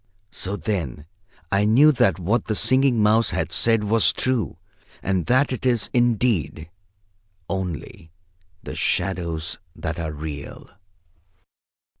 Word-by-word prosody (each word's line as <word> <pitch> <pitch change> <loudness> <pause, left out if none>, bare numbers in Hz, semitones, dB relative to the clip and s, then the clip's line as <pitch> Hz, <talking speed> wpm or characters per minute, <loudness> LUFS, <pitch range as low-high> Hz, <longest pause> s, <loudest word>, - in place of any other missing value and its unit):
So 100 +1 -4
then 80 - -3 0.5
I 100 +1 +2
knew 125 +9 +6
that 95 - +2
what 100 +6 0
the 110 - -1
Singing 130 -1 +3
Mouse 110 +1 +4
had 95 -1 -2
said 115 -2 +2
was 110 +1 +3
true, 130 -3 -1 0.5
and 95 -3 -1
that 130 +3 +3
it 125 - -6
is, 120 -4 +1
indeed, 110 - 0 0.8
only 90 -3 -5 0.5
the - - -7
shadows 90 -3 -2 0.2
that 85 +1 -4
are 80 -2 -3
real. 75 -2 -8
100 Hz, 120 wpm, -23 LUFS, 85-115 Hz, 0.8 s, knew